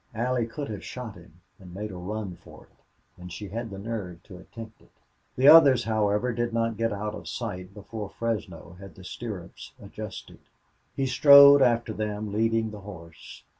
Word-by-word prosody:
Allie 120 Hz, 0 st, -1 dB
could 140 Hz, +4 st, -6 dB
have 105 Hz, -3 st, -6 dB
shot 125 Hz, -4 st, -7 dB
him 85 Hz, -1 st, -18 dB, 0.2 s
and 90 Hz, -2 st, -13 dB
made 105 Hz, +1 st, -5 dB
a -, -, -9 dB
run 95 Hz, +1 st, -5 dB
for -, -, -16 dB
it, -, -, -27 dB
and 90 Hz, 0 st, -9 dB
she 100 Hz, +3 st, -8 dB
had 115 Hz, +3 st, -5 dB
the 100 Hz, -, -8 dB
nerve 100 Hz, -5 st, -6 dB
to 90 Hz, -4 st, -13 dB
attempt 115 Hz, +3 st, -12 dB
it. -, -, -23 dB, 0.5 s
The 130 Hz, +2 st, +3 dB
others, 145 Hz, -6 st, +8 dB
however, 110 Hz, +2 st, 0 dB
did 120 Hz, 0 st, -2 dB
not 115 Hz, -1 st, 0 dB
get 115 Hz, +1 st, -1 dB
out 105 Hz, +1 st, -4 dB
of -, -, -9 dB
sight 90 Hz, +2 st, -6 dB
before 105 Hz, 0 st, -7 dB
Fresno 90 Hz, -7 st, -5 dB
had 95 Hz, -1 st, -12 dB
the 95 Hz, -, -14 dB
stirrups 100 Hz, -3 st, -8 dB
adjusted. 105 Hz, 0 st, -9 dB, 0.6 s
He 135 Hz, -, -1 dB
strode 140 Hz, +2 st, +8 dB
after 120 Hz, -3 st, +2 dB
them, 105 Hz, -1 st, -4 dB
leading 115 Hz, 0 st, 0 dB
the 105 Hz, -, -9 dB
horse. 85 Hz, -5 st, -12 dB
110 Hz, 180 wpm, -26 LUFS, 95-115 Hz, 0.6 s, others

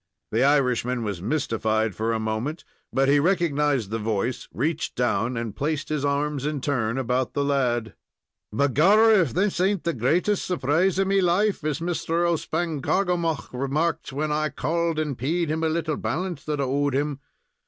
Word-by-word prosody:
The 115 Hz, +4 st, +2 dB
Irishman 125 Hz, -4 st, +2 dB
was 100 Hz, -5 st, -4 dB
mystified 110 Hz, -4 st, 0 dB
for 110 Hz, +5 st, -1 dB
a 115 Hz, -, 0 dB
moment, 110 Hz, +9 st, -3 dB, 0.3 s
but 135 Hz, 0 st, +2 dB
he 145 Hz, +1 st, +5 dB
recognized 150 Hz, -, +1 dB
the 115 Hz, -, -1 dB
voice, 110 Hz, +3 st, -2 dB
reached 155 Hz, +5 st, -2 dB
down, 120 Hz, 0 st, 0 dB
and 115 Hz, -3 st, -4 dB
placed 155 Hz, +3 st, -2 dB
his 150 Hz, -2 st, -1 dB
arms 145 Hz, 0 st, 0 dB
in 150 Hz, 0 st, -2 dB
turn 125 Hz, -4 st, -1 dB
about 125 Hz, -1 st, -1 dB
the 140 Hz, -, +1 dB
lad. 125 Hz, -6 st, 0 dB, 0.6 s
"Begorrah, 190 Hz, -, +5 dB
if 155 Hz, -8 st, 0 dB
this 190 Hz, 0 st, +1 dB
ain't 195 Hz, -1 st, +1 dB
the 170 Hz, -, 0 dB
greatest 170 Hz, -, +1 dB
surprise 175 Hz, +2 st, +1 dB
of 195 Hz, -, +2 dB
me 195 Hz, 0 st, +2 dB
life, 190 Hz, +2 st, +1 dB
as 150 Hz, 0 st, -2 dB
Mr. 170 Hz, 0 st, 0 dB
O'Spangarkoghomagh 170 Hz, 0 st, -1 dB
remarked 145 Hz, +6 st, -1 dB
when 150 Hz, +3 st, -2 dB
I 155 Hz, 0 st, 0 dB
called 165 Hz, +3 st, -1 dB
and 150 Hz, -3 st, -1 dB
paid 155 Hz, +7 st, -1 dB
him 160 Hz, +1 st, -1 dB
a 160 Hz, -, +2 dB
little 160 Hz, -2 st, -1 dB
balance 175 Hz, -3 st, -3 dB
that 150 Hz, -1 st, -2 dB
I -, -, +1 dB
owed 140 Hz, +1 st, 0 dB
him. 145 Hz, 0 st, -1 dB
145 Hz, 170 wpm, -25 LUFS, 125-165 Hz, 0.6 s, he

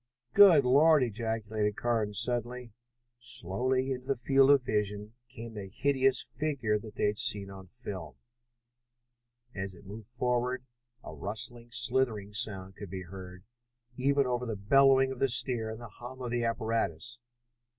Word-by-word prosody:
"Good 180 Hz, -9 st, +7 dB
Lord!" 145 Hz, +3 st, +5 dB
ejaculated 110 Hz, -2 st, -2 dB
Carnes 110 Hz, -4 st, 0 dB
suddenly. 120 Hz, -1 st, -2 dB, 0.5 s
Slowly 125 Hz, +4 st, 0 dB
into 130 Hz, 0 st, -5 dB
the 135 Hz, -, +1 dB
field 135 Hz, +2 st, +3 dB
of 140 Hz, -2 st, +5 dB
vision 105 Hz, -1 st, -2 dB, 0.2 s
came 115 Hz, -2 st, -10 dB
the 100 Hz, -3 st, -7 dB
hideous 135 Hz, +3 st, +1 dB
figure 120 Hz, -4 st, -2 dB
they 110 Hz, 0 st, -4 dB
had 105 Hz, 0 st, 0 dB
seen 105 Hz, -5 st, +2 dB
on 95 Hz, -1 st, -11 dB
the -, -, -24 dB
film. 105 Hz, -6 st, -7 dB, 1.4 s
As 95 Hz, -1 st, -6 dB
it 90 Hz, -, -17 dB
moved 105 Hz, +2 st, -10 dB
forward 125 Hz, +1 st, -2 dB, 0.4 s
a -, -, -9 dB
rustling, 115 Hz, +3 st, -3 dB
slithering 120 Hz, -4 st, +1 dB
sound 95 Hz, -4 st, 0 dB
could 100 Hz, -, -8 dB
be 95 Hz, +1 st, -6 dB
heard, 90 Hz, 0 st, -11 dB, 0.5 s
even 140 Hz, +2 st, +1 dB
over 125 Hz, 0 st, -2 dB
the 110 Hz, -, -3 dB
bellowing 135 Hz, +5 st, +4 dB
of 130 Hz, -, -7 dB
the 135 Hz, -, +2 dB
steer 120 Hz, -2 st, +3 dB
and 110 Hz, +1 st, -7 dB
the 120 Hz, -, -9 dB
hum 120 Hz, +4 st, -11 dB
of 120 Hz, -, -4 dB
the 120 Hz, -1 st, -1 dB
apparatus. 115 Hz, -1 st, -2 dB
120 Hz, 150 wpm, -29 LUFS, 105-130 Hz, 1.4 s, Good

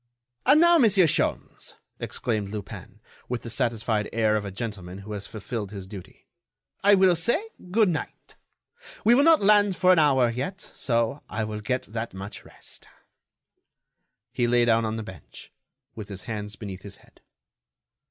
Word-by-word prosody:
"And 285 Hz, +3 st, +7 dB
now, 345 Hz, 0 st, +6 dB
Monsieur 205 Hz, -, +5 dB
Sholmes," 155 Hz, -, -1 dB, 0.2 s
exclaimed 105 Hz, -4 st, -2 dB
Lupin, 105 Hz, 0 st, -8 dB, 0.3 s
with 125 Hz, -1 st, -3 dB
the 115 Hz, -, -5 dB
satisfied 110 Hz, -2 st, 0 dB
air 110 Hz, -2 st, +2 dB
of 105 Hz, -, -1 dB
a 100 Hz, -, -5 dB
gentleman 95 Hz, -3 st, -6 dB
who 105 Hz, -, -8 dB
has 100 Hz, -1 st, -6 dB
fulfilled 110 Hz, -1 st, -5 dB
his 100 Hz, -2 st, -8 dB
duty, 95 Hz, -2 st, -12 dB, 0.6 s
"I 205 Hz, +1 st, +7 dB
will 190 Hz, -2 st, +5 dB
say 240 Hz, -, +1 dB, 0.2 s
good 215 Hz, +3 st, +4 dB
night. 170 Hz, -, -5 dB, 0.7 s
We 230 Hz, -, +7 dB
will 260 Hz, -, +5 dB
not 325 Hz, -6 st, +5 dB
land 205 Hz, -1 st, +4 dB
for 185 Hz, 0 st, +5 dB
an 175 Hz, -, +4 dB
hour 130 Hz, -6 st, +4 dB
yet, 140 Hz, +11 st, -4 dB
so 115 Hz, +2 st, -1 dB
I 110 Hz, -, -2 dB
will 105 Hz, 0 st, -5 dB
get 125 Hz, +4 st, -1 dB
that 110 Hz, -1 st, -5 dB
much 95 Hz, +2 st, -8 dB
rest." -, -, -11 dB, 1.4 s
He 120 Hz, -1 st, 0 dB
lay 120 Hz, 0 st, +3 dB
down 115 Hz, -1 st, +3 dB
on 110 Hz, 0 st, -2 dB
the 110 Hz, -, -4 dB
bench, 95 Hz, -8 st, -12 dB, 0.4 s
with 110 Hz, -3 st, -8 dB
his 95 Hz, -2 st, -6 dB
hands 105 Hz, -2 st, -5 dB
beneath 95 Hz, -2 st, -8 dB
his 100 Hz, 0 st, -9 dB
head. -, -, -24 dB
115 Hz, 165 wpm, -25 LUFS, 105-175 Hz, 1.4 s, And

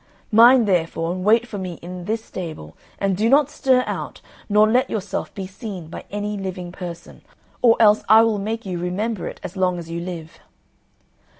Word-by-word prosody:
Mind, 235 Hz, +1 st, +7 dB
therefore, 165 Hz, -2 st, 0 dB
and 185 Hz, 0 st, -4 dB
wait 225 Hz, +4 st, +4 dB
for 210 Hz, -3 st, -6 dB
me 185 Hz, -2 st, -4 dB
in 180 Hz, +2 st, -9 dB
this 220 Hz, +2 st, -2 dB
stable 160 Hz, -, -7 dB, 0.2 s
and 195 Hz, -1 st, 0 dB
do 215 Hz, +5 st, +1 dB
not 285 Hz, +2 st, +4 dB
stir 260 Hz, -3 st, +2 dB
out, -, -, -5 dB, 0.3 s
nor 210 Hz, +1 st, +5 dB
let 245 Hz, +4 st, +2 dB
yourself 200 Hz, -3 st, -3 dB
be 195 Hz, -, -5 dB
seen 185 Hz, -4 st, -8 dB
by -, -, -8 dB
any 205 Hz, +1 st, -3 dB
living 185 Hz, -2 st, -5 dB
person, 175 Hz, -2 st, -9 dB, 0.4 s
or 235 Hz, -2 st, +6 dB
else 215 Hz, -1 st, +5 dB
I 220 Hz, +1 st, +8 dB
will 220 Hz, -2 st, +1 dB
make 220 Hz, +3 st, -4 dB
you 180 Hz, -2 st, -4 dB
remember 190 Hz, +4 st, -2 dB
it -, -, -8 dB
as 180 Hz, -, -7 dB
long 185 Hz, -1 st, +1 dB
as 165 Hz, -1 st, -8 dB
you 170 Hz, 0 st, -3 dB
live." 170 Hz, -2 st, -7 dB
195 Hz, 190 wpm, -22 LUFS, 180-220 Hz, 0.4 s, I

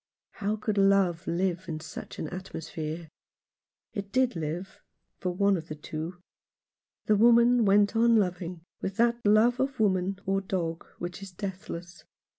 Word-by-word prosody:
How 210 Hz, +1 st, -2 dB
could 215 Hz, -1 st, -1 dB
love 195 Hz, -4 st, +3 dB
live 180 Hz, +1 st, 0 dB
in 155 Hz, -1 st, -3 dB
such 165 Hz, -, -8 dB
an -, -, -3 dB
atmo 185 Hz, -2 st, -6 dB
sphere? 160 Hz, +1 st, -5 dB, 0.8 s
It 200 Hz, -2 st, -5 dB
did 255 Hz, -2 st, +2 dB
live, 165 Hz, +4 st, -4 dB, 0.4 s
for 185 Hz, -, -1 dB
one 200 Hz, +2 st, +3 dB
of 165 Hz, -3 st, -5 dB
the 155 Hz, -, -5 dB
two. 160 Hz, +4 st, -6 dB, 0.9 s
The 215 Hz, -, +4 dB
woman 235 Hz, +2 st, +6 dB
went 205 Hz, +2 st, +4 dB
on 230 Hz, +1 st, +5 dB
loving 180 Hz, -4 st, 0 dB, 0.2 s
with 195 Hz, -, -3 dB
that 235 Hz, 0 st, +2 dB
love 220 Hz, +4 st, +4 dB
of 265 Hz, -1 st, -1 dB
woman 190 Hz, -2 st, +2 dB
or 195 Hz, 0 st, +1 dB
dog 170 Hz, -4 st, -3 dB
which 175 Hz, +2 st, -6 dB
is 195 Hz, -1 st, -8 dB
deathless. 180 Hz, -2 st, -7 dB
195 Hz, 155 wpm, -28 LUFS, 175-215 Hz, 0.9 s, woman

